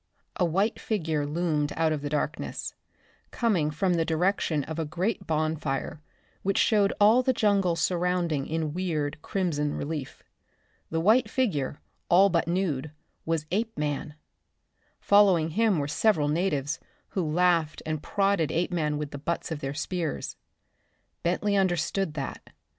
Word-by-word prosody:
A 180 - +3
white 195 +7 +1
figure 160 -8 -1
loomed 150 -2 0
out 160 -1 +2
of 150 -2 -1
the 145 - -3
darkness, 150 +1 -3 0.6
coming 195 -11 +1
from 175 +5 0
the 165 -1 +2
direction 165 -2 +1
of 160 +3 -5
a - - +1
great 175 +8 -2
bonfire 155 -2 -1 0.4
which 195 0 0
showed 205 -3 +4
all 215 +5 +6
the 260 +1 +2
jungle 200 -6 +2
surrounding 175 -4 0
in 160 -2 -2
weird, 155 -4 -2
crimson 155 -7 -1
relief. 145 -2 -5 0.7
The 165 - -1
white 220 +9 +4
figure, 150 - -1 0.3
all 190 +3 +6
but 170 -2 +1
nude, 170 -5 -1 0.4
was 160 -2 0
Apeman! 150 -9 -2 0.8
Following 195 -6 +4
him 215 0 +2
were 140 -1 -1
several 150 -1 +2
natives, 150 -2 0 0.3
who 190 - -1
laughed 165 -1 +1
and 155 -1 -2
prodded 195 -5 +1
Apeman 165 -3 0
with 150 -1 -4
the 145 - -6
butts 170 +3 -3
of 160 - -3
their 135 0 -4
spears. 165 +1 -3 0.9
Bentley 200 +4 0
understood 180 -2 0
that. 140 -3 -5
165 Hz, 140 wpm, -27 LUFS, 150-190 Hz, 0.9 s, all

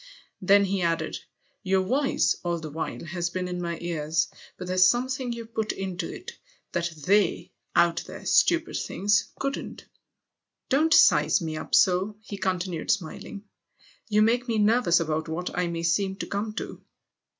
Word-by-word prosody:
Then 200 +2 +5
he 195 0 -1
added: 165 -1 -1 0.2
" - - -39
Your 190 -1 +2
voice, 270 +8 +1
all 175 -1 -1
the 155 -2 -7
while, 160 +2 -5
has 175 +1 -2
been 180 +1 -3
in 180 0 -4
my 170 -1 -3
irs. 165 -1 -1 0.3
But 180 - -6
there's 185 +1 +5
something 255 +2 -1
you 235 -1 -5
put 220 -1 -2
into 190 -2 -4
it - - -10 0.3
that 170 -1 -1
icy 180 +5 +1 0.2
out 170 -1 +3
there, - - -9
stupid 330 -1 +3
things! 205 +2 0
couldn't. 275 0 -4 0.8
Don't 305 +4 +3
size 155 - +5
me 160 -1 -4
up' 155 - -1
so," 190 +3 +3
he 205 -2 -7
continued 180 -3 -2
smiling; 195 +2 -3 0.7
"you 210 0 +4
lake 245 +2 +1
me 230 -2 0
nervous 210 -4 +4
about 160 -1 -2
what 175 +3 -4
I 180 -1 0
may 170 -1 -4
seem 190 +3 +1
to 200 - -5
come 210 +2 -3
to!" - - -6
185 Hz, 165 wpm, -26 LUFS, 170-210 Hz, 0.8 s, Then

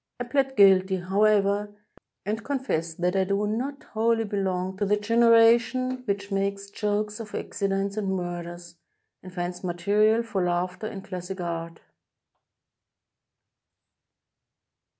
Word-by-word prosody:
I - - -1
plead 270 +1 0
guilty, 190 -1 +6
however, 200 +2 +2 0.6
and 220 +2 -2
confess 225 - -2
that 180 +2 0
I 190 - +3
do 200 +2 0
not 260 +7 -3
wholly 225 +1 +2
belong 190 -3 -2
to 205 - 0
the 210 +1 +3
generation 230 +3 +4
which 200 -1 -3
makes'jokes 200 +2 -2
of 215 -2 -7
accidents 195 0 -2
and 195 -2 -1
murders, 175 -1 -6 0.4
and 185 - -11
finds 180 0 -5
material 205 +6 +2
for 205 -5 -2
laughter 180 +4 -1
in 195 -3 -7
classic 185 0 -6
art. 165 -1 -5
200 Hz, 115 wpm, -26 LUFS, 185-220 Hz, 0.6 s, guilty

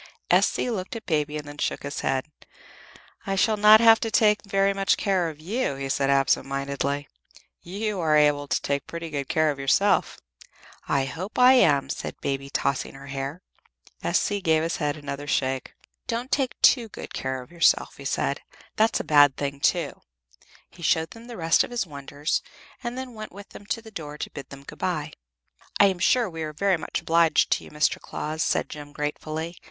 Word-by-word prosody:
S.C. 250 - +3
looked 190 -2 -4
at 230 - -7
Baby 150 -2 0
and 150 -1 -7
then 145 0 -10
shook - - -2
his 140 0 -4
head. 130 -1 0 1.0
"I 195 - 0
shall 215 +3 +3
not 210 +1 +8
have 225 -1 +7
to 225 - -2
take 210 -1 +3
very 195 0 +1
much 195 -1 +2
care 185 -4 +1
of 155 -2 -11
you," 195 - -2
he 135 0 -5
said, 135 0 +1
absent 135 -1 +2
mindedly. 140 +1 -2 0.5
"You 200 +3 -3
are 155 -3 +3
able 145 -1 +3
to - - +1
take 140 0 -2
pretty 170 -1 -6
good 140 -2 -4
care 155 -1 +2
of 140 - -7
yourself." 165 +9 +2 0.7
"I 135 -1 +1
hope 180 +10 -6
I 250 +1 +7
am," 145 - +4
said - - -6
Baby, 140 0 -3
tossing 140 -1 -1
her 135 0 -11
head. 135 +5 -5 0.6
S.C. 205 -1 0
gave 160 -3 +2
his 165 - -1
head 150 -1 -1
another 145 -1 -6
shake. 130 -1 -1 0.3
"Don't 240 +3 -3
take 270 -3 0
too 235 -4 +5
good - - -9
care 130 0 -3
of 125 - -20
yourself," 170 -1 +2
he - - -11
said. - - -1 0.4
"That's 220 +1 +3
a - - -3
bad 145 -2 +5
thing, 140 -1 -3
too." - - 0 0.7
He 170 - -16
showed 160 0 +1
them 230 0 -12
the 240 - -8
rest 165 -1 +3
of - - -6
his 240 -3 -2
wonders, 145 0 -3 0.4
and 240 +1 -4
then 260 -1 -6
went 215 -3 -8
with 200 +1 -11
them 205 - -13
to 230 - -2
the 220 - -12
door 150 -6 -7
to - - -5
bid 140 - -9
them 140 0 -11
good - - -12
bye. - - -2 0.7
"I 205 - +8
am 190 -2 +1
sure 240 +6 +3
we 165 -3 -7
are 155 -1 -4
very 190 +3 +1
much 160 - -4
obliged 165 0 +3
to - - +1
you, - - -12
Mr. 150 0 0
Claus," 155 +1 -4
said - - +1
Jem, 145 -1 -9
gratefully. 155 +3 -4
160 Hz, 200 wpm, -25 LUFS, 140-200 Hz, 1.0 s, not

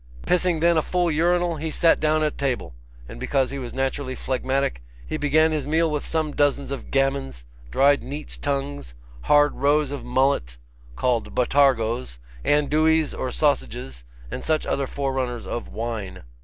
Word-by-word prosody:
Pissing 180 -2 +1
then 170 0 +4
a - - +4
full 175 +1 0
urinal, 175 +1 +1
he 160 +2 -3
sat 165 +1 +3
down 155 0 +2
at 150 - 0
table; 130 - -2 0.3
and - - -10
because 135 - 0
he 140 - -4
was 125 -2 -6
naturally 135 0 -2
phlegmatic, 130 - -1 0.2
he - - -4
began 155 +1 +3
his 150 -3 -2
meal 160 +1 +2
with 150 -1 -3
some 155 -2 -1
dozens 140 -1 +1
of 140 - -6
gammons, 135 - -1 0.2
dried 140 - +4
neat's 145 +2 -6
tongues, 140 - -3 0.3
hard 145 0 +5
roes 145 0 +2
of 145 - -5
mullet, 125 - 0 0.4
called 120 - -1
botargos, 120 - +2 0.3
andouilles 155 - +2
or - - -3
sausages, - - -1 0.3
and - - -5
such 155 -1 0
other 140 -1 -1
forerunners 130 -4 -3
of 120 - -4
wine. 110 - -5
140 Hz, 155 wpm, -24 LUFS, 125-155 Hz, 0.4 s, hard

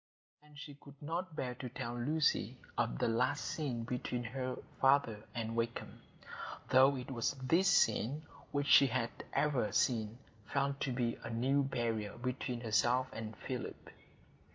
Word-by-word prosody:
And 150 -1 -18
she 145 0 -8
could 140 0 -15
not 165 +3 -4
bear 125 -4 -2
to 125 +1 -6
tell 120 -1 -4
Lucy 150 +6 +1 0.2
of - - 0
the - - +1
last 125 +5 +1
scene 130 -7 -2
between 125 0 -3
her 130 +2 -3 0.2
father 135 -6 +3
and 115 -1 -2
Wakem, 115 0 -3 0.7
though 130 +2 +7
it 130 +1 -6
was 120 +1 0
this 160 +8 +2
scene 145 - +3 0.3
which 145 0 0
she 140 - +7
had 120 -1 -1 0.2
ever 140 -7 +1
since 110 0 +1 0.3
felt 140 0 0
to 135 - -1
be 120 -1 -1
a - - -5
new 130 +5 +2
barrier 115 -6 -2
between 125 0 -3
herself 120 +3 +2
and 110 -1 -6
Philip. - - -6
125 Hz, 155 wpm, -35 LUFS, 115-140 Hz, 0.7 s, though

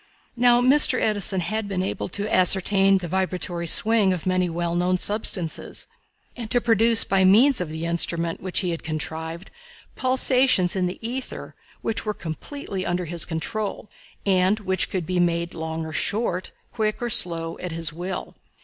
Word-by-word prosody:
Now 245 0 +4
Mr. 260 0 +5
Edison 205 -3 0
had 215 +5 -3
been 190 -2 -2
able 190 - -4
to 205 +3 -3
ascertain 195 +1 +4
the 180 -2 -5
vibratory 180 -1 -2
swing 210 +1 +4
of 180 - -6
many 185 -1 0
well 170 0 -3
known 180 +1 +1
substances, 185 -4 0 0.5
and 235 -3 -7
to 245 - +2
produce, 230 0 +3
by 195 -1 +1
means 225 +6 +5
of 175 - -4
the 160 +1 -5
instrument 170 0 0
which 185 +1 -2
he 180 -2 -2
had 165 - -5
contrived, 160 +3 -5 0.4
pulsations 255 -7 +3
in 185 -1 0
the 180 - -6
ether 255 +2 -6 0.3
which 225 - -2
were 210 -1 -3
completely 190 - -6
under 180 0 -2
his 170 0 0
control, 210 +5 -4 0.3
and 190 +2 +2
which 190 -1 -1
could 185 -4 -3
be 180 +2 -2
made 170 0 0
long 160 0 -5
or 160 - -8
short, 195 -1 -1 0.2
quick 215 -2 -2
or 240 - -3
slow, 165 -4 +1
at 180 - -6
his 165 -1 -4
will. 180 +4 -6
185 Hz, 165 wpm, -23 LUFS, 170-215 Hz, 0.5 s, Mr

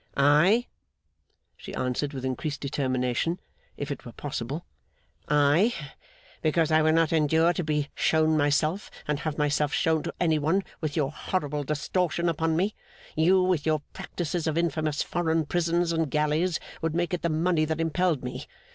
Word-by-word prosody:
'I!' 150 - +5 0.9
she - - -9
answered, 130 +3 -1
with 130 -2 -5
increased 140 +3 -3
determination, 130 +3 -1 0.4
if 145 0 -4
it 140 - -5
were 120 - -9
possible. 140 +2 -5 0.6
'I, 150 +10 +3 0.7
because 160 0 +2
I 155 0 +5
will 155 0 +4
not 165 0 +3
endure 160 +2 +3
to 175 - -2
be 150 -2 -1
shown 160 0 +2
myself, 155 +5 +1 0.2
and 150 -1 0
have 150 -1 -3
myself 150 0 +1
shown 160 0 +2
to - - -5
any 160 -3 +2
one, 165 +7 +1 0.2
with 155 -2 -2
your 145 -4 0
horrible 150 -3 -2
distortion 170 +3 0
upon 160 0 0
me. 200 +4 +1 0.4
You, 185 +4 +4
with 180 -5 +1
your 155 -2 +1
practices 170 -1 -3
of 160 0 0
infamous 155 -3 0
foreign 165 -2 0
prisons 170 +1 +1
and 165 -2 0
galleys 150 +4 +1 0.2
would 165 -1 -1
make 175 +1 0
it 180 - -1
the 170 - 0
money 160 +1 +2
that 160 +1 -2
impelled 165 -1 +1
me. 125 - -6
155 Hz, 165 wpm, -27 LUFS, 145-170 Hz, 0.9 s, I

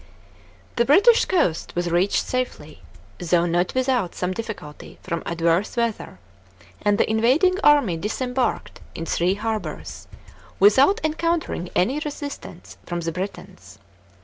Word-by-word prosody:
§ - - -23
3. - - -25 0.7
The 235 - +3
British 405 - +5
coast 305 - 0
was 175 0 -1
reached 180 +4 +1
safely, 250 -12 -4 0.4
though 175 0 +2
not 175 +4 0
without 255 -8 0
some 180 0 -2
difficulty 205 -9 -8
from 170 -3 -3
adverse 170 +6 0
weather, 230 - -2 0.6
and 205 0 +2
the - - +2
invading 265 - +2
army 285 - +4
disembarked 250 +7 -2 0.2
in 165 - -5
three 175 +3 +1
harbours, 220 +1 -5 0.5
without 260 - +5
encountering 315 - -1
any 255 +11 +1
resistance 290 -1 -8
from 175 -1 -4
the 165 0 -2
Britons. 160 - -8
210 Hz, 130 wpm, -23 LUFS, 175-265 Hz, 0.7 s, British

